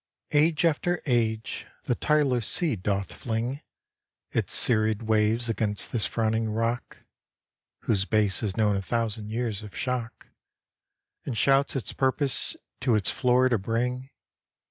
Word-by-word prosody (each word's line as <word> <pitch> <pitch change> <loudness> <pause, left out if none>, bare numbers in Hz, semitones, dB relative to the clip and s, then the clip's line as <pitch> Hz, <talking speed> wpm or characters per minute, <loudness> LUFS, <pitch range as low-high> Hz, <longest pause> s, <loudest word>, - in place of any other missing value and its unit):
Age 155 +1 +3
after 170 +2 +1
age 115 -4 -1 0.2
the - - 0
tireless 135 -5 +1
sea 165 -8 +2
doth 100 0 -2
fling 120 +5 -3 0.7
Its - - -1
serried 110 -1 +4
waves 110 +2 +2
against 105 -2 -1
this 115 -4 -1
frowning 110 0 0
rock, 115 +3 -3 0.8
(Whose 100 -4 0
base 105 -2 +2
has 100 -4 -3
known 105 -2 +3
a 95 - -1
thousand 110 0 -2
years 110 -2 -2
of 105 -2 -10
shock,) 125 -3 -3 1.0
And 125 -5 -4
shouts 135 +4 +3
its 135 - -4
purpose 135 +1 0 0.2
to 125 -3 +2
its 100 -4 0
floor 125 0 +3
to 115 -4 +1
bring. 125 +5 -2
115 Hz, 135 wpm, -27 LUFS, 110-125 Hz, 1.0 s, serried